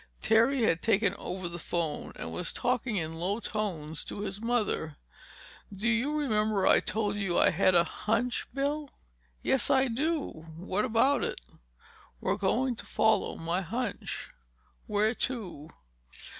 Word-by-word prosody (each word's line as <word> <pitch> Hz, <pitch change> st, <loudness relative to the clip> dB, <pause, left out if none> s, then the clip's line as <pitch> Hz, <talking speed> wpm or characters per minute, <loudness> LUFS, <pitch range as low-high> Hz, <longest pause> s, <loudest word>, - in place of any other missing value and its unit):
Terry 235 Hz, +4 st, +4 dB
had 175 Hz, -6 st, +2 dB
taken 205 Hz, -3 st, +3 dB
over 185 Hz, -1 st, -4 dB
the 175 Hz, 0 st, -6 dB
phone 165 Hz, -2 st, -2 dB
and 80 Hz, -, -6 dB
was 85 Hz, -, -1 dB
talking 245 Hz, -2 st, 0 dB
in 165 Hz, -3 st, -3 dB
low 195 Hz, +5 st, 0 dB
tones 175 Hz, -10 st, -3 dB
to 205 Hz, -, -5 dB
his 200 Hz, 0 st, -4 dB
mother. 215 Hz, -10 st, 0 dB, 0.7 s
"Do 200 Hz, +3 st, -3 dB
you 245 Hz, +6 st, +2 dB
remember 215 Hz, -8 st, +1 dB
I -, -, +6 dB
told 210 Hz, -2 st, -1 dB
you 195 Hz, -4 st, 0 dB
I -, -, +5 dB
had 185 Hz, +1 st, +3 dB
a 170 Hz, -, +6 dB
hunch, 230 Hz, +7 st, -1 dB
Bill?" 285 Hz, +1 st, -1 dB, 0.5 s
"Yes, 265 Hz, -, +2 dB
I 270 Hz, -1 st, +5 dB
do. 270 Hz, -, -2 dB
What 190 Hz, +5 st, -1 dB
about 255 Hz, +4 st, +3 dB
it?" -, -, -2 dB, 0.8 s
"We're -, -, 0 dB
going 245 Hz, +6 st, +1 dB
to -, -, -9 dB
follow 220 Hz, 0 st, +2 dB
my 170 Hz, +3 st, -1 dB
hunch." 225 Hz, +4 st, -4 dB, 0.6 s
"Where 210 Hz, +2 st, +2 dB
to?" 190 Hz, -, -4 dB
215 Hz, 145 wpm, -30 LUFS, 180-245 Hz, 0.8 s, I